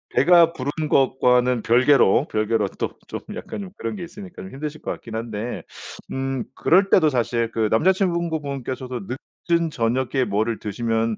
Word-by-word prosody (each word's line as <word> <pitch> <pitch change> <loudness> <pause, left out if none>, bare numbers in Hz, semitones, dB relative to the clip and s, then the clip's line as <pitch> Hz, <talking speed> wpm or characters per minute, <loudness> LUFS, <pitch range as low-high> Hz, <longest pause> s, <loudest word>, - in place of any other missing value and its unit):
배가 170 +2 +6
부른 145 +2 -3
것과는 125 -2 +3
별개로 125 -2 +4
별개로 110 -1 +1
또 - - -1 0.2
좀 - - -5 0.2
약간 - - -6
좀 190 -2 -8
그런 - - -4
게 185 - -6
있으니까 185 +1 -10
좀 190 - -9
힘드실 150 +2 -6
것 - - -3
같긴 115 -2 -7
한데 115 0 -4 0.5
음 135 -2 -2
그럴 190 +3 +3
때도 160 -6 +5
사실 120 -3 0
그 110 -1 +1
남자친구분께서도 145 - 0 0.5
늦은 170 -1 +3
저녁에 130 +2 0
뭐를 110 +3 -1
드시면 115 +1 -1
130 Hz, 320 characters per minute, -23 LUFS, 115-160 Hz, 0.5 s, 배가